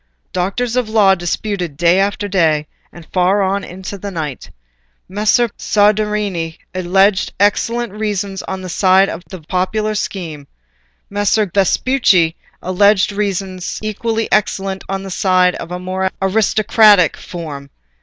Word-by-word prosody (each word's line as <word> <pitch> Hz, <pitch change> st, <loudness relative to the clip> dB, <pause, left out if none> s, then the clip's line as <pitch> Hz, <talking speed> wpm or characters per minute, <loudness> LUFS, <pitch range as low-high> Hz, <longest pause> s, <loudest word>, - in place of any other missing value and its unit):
Doctors 200 Hz, +7 st, -1 dB
of 250 Hz, -3 st, 0 dB
law 210 Hz, -3 st, +4 dB
disputed 175 Hz, -2 st, -3 dB
day 175 Hz, +3 st, +3 dB
after 200 Hz, +1 st, 0 dB
day, 160 Hz, -6 st, +1 dB, 0.3 s
and 170 Hz, -2 st, -13 dB
far 190 Hz, +2 st, +2 dB
on 195 Hz, +1 st, -1 dB
into 190 Hz, +2 st, -8 dB
the 200 Hz, -, -5 dB
night. 155 Hz, -8 st, -5 dB, 0.6 s
Messer 215 Hz, +5 st, +2 dB
Pagolantonio 220 Hz, -, -7 dB, 0.2 s
Soderini 205 Hz, -6 st, -2 dB, 0.2 s
alleged 190 Hz, +2 st, +2 dB
excellent 230 Hz, +2 st, +1 dB
reasons 205 Hz, -2 st, -3 dB
on 190 Hz, 0 st, -5 dB
the -, -, -6 dB
side 190 Hz, +2 st, +3 dB
of 165 Hz, -, -6 dB
the 185 Hz, -, -9 dB
popular 190 Hz, +6 st, -1 dB
scheme; 165 Hz, -8 st, -5 dB, 0.6 s
Messer 205 Hz, +1 st, +1 dB
Guidantonio 180 Hz, -, -14 dB
Vespucci 190 Hz, -8 st, +2 dB, 0.3 s
alleged 200 Hz, +2 st, +3 dB
reasons 195 Hz, -3 st, -3 dB
equally 225 Hz, +1 st, -2 dB
excellent 195 Hz, -2 st, 0 dB
on 195 Hz, 0 st, -3 dB
the 195 Hz, -, -7 dB
side 185 Hz, -1 st, +2 dB
of 165 Hz, -, -7 dB
a 180 Hz, -, -4 dB
more 185 Hz, +1 st, -2 dB
aristocratic 210 Hz, -1 st, +4 dB
form. 150 Hz, -5 st, -8 dB
195 Hz, 135 wpm, -17 LUFS, 180-210 Hz, 0.6 s, law